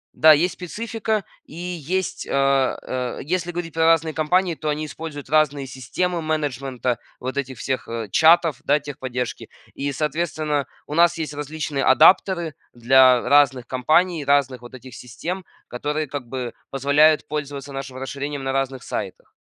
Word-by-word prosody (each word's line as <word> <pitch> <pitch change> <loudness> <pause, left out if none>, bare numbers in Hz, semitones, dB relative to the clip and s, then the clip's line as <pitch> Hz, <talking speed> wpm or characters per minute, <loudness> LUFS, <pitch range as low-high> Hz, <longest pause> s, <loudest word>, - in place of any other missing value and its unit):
да, 155 0 +7
есть 170 +4 +2
специфика, 220 +2 -3 0.2
и - - -13
есть, 180 +1 -3
а, 135 -1 +2
а, 125 -1 -3
если 175 +3 -2
говорить 170 -2 -5
про 160 0 +2
разные 165 -1 +3
компании, 175 +4 +1
то 155 - -4
они 150 +1 -2
используют 150 -2 -8
разные 145 -3 +2
системы 135 +8 -3
менеджмента 135 -6 -2 0.2
вот 130 +1 -5
этих 135 -2 -4
всех, 130 -1 -3
э, 115 -2 -5
чатов, 160 -3 +4
да, 150 -2 +3
техподдержки. 130 -4 -5 0.2
И, 140 0 -3
соответственно, 150 -1 -1 0.2
у 150 - -7
нас 170 +1 +4
есть 155 -2 -4
различные 145 -1 -3
адаптеры 165 +3 +4 0.2
для 130 +1 +5
разных 140 -3 +4
компаний, 155 +5 +1
разных 135 -3 +1
вот 120 +1 -11
этих 130 0 -12
систем, 175 +9 -6 0.2
которые 150 +5 -2
как 140 -2 -6
бы 125 -1 -5 0.2
позволяют 145 +3 +3
пользоваться 145 -2 -5
нашим 135 -1 -6
расширением 140 +1 -5
на 135 - -1
разных 135 -1 -2
сайтах. - - -6
145 Hz, 150 wpm, -22 LUFS, 130-160 Hz, 0.2 s, да